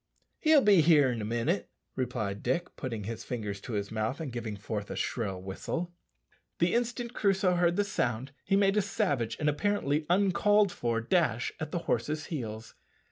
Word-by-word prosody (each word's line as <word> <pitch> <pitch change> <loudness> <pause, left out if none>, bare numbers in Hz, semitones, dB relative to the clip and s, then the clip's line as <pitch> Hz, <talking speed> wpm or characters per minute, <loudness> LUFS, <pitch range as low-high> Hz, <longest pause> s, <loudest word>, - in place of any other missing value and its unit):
"He'll 310 -2 +5
be 200 -5 +6
here 150 -4 +5
in 115 -2 -3
a - - -3
minute," 120 - -1 0.3
replied 110 -6 -2
Dick, 170 +9 -1
putting 115 -6 -4
his 115 +3 -5
fingers 105 -5 -4
to 120 - -7
his 100 -1 -2
mouth 110 +5 -2
and 155 -5 -4
giving 115 -3 -4
forth 105 0 -4
a - - -4
shrill 100 -6 -2
whistle. 165 - -4 0.6
The 170 +1 +2
instant 240 0 -1
Crusoe 195 -4 +2
heard 175 -1 +2
the 205 - +2
sound 140 - -2
he 195 - +1
made 200 0 +3
a - - +5
savage 145 - -1
and 150 - 0
apparently 150 -2 0
uncalled 200 +2 +4
for 115 -5 -1
dash 120 -4 +1
at 155 - -4
the 175 - -1
horse's 150 +6 -1
heels. 110 -5 -5
145 Hz, 180 wpm, -30 LUFS, 115-190 Hz, 0.6 s, be